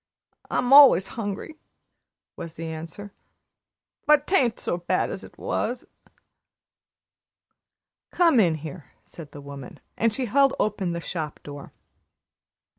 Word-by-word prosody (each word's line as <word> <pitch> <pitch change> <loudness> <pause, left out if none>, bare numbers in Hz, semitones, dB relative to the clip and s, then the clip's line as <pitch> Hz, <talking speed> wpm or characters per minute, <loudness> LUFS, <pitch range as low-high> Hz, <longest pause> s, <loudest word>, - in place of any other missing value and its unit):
"I'm 250 +2 +1
allus 275 -9 +8
'ungry," 225 +8 -5 0.8
was 165 -1 -8
the 165 - -6
answer; 165 +5 -8 0.9
"but 300 -1 +5
'tain't 260 - +1
so 175 - -2
bad 175 - -1
as - - -7
it - - -14
was." 245 0 -3 2.2
"Come 335 -8 +3
in 170 -6 +3
here," 155 0 -10
said 155 -4 -12
the 145 - -10
woman, 140 -2 -10 0.2
and 230 0 +1
she 260 +3 -3
held 275 +4 +3
open 195 -4 -1
the 170 - -3
shop 160 -3 -5
door. 145 -1 -10
195 Hz, 120 wpm, -24 LUFS, 160-255 Hz, 2.2 s, allus